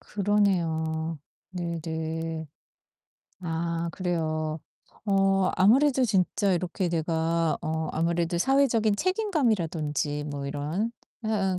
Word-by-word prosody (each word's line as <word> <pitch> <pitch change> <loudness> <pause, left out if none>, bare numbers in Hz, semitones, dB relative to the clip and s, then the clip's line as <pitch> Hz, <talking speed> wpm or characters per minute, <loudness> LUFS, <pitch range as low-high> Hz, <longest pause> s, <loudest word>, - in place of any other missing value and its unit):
그러네요. 165 -6 0 0.3
네네. 160 -2 -3 0.9
아. 170 0 -2
그래요. 155 -3 -1 0.5
어 195 -1 +3
아무래도 260 +7 +5
진짜 200 -1 +2
이렇게 180 +1 -1
내가 165 0 +1
어 160 0 -2
아무래도 170 +1 0
사회적인 230 -1 +3
책임감이라든지 185 - 0
뭐 145 -2 -4
이런 150 +9 -2 0.4
해 220 - -1
응 190 -4 +1
170 Hz, 225 characters per minute, -27 LUFS, 160-200 Hz, 0.9 s, 아무래도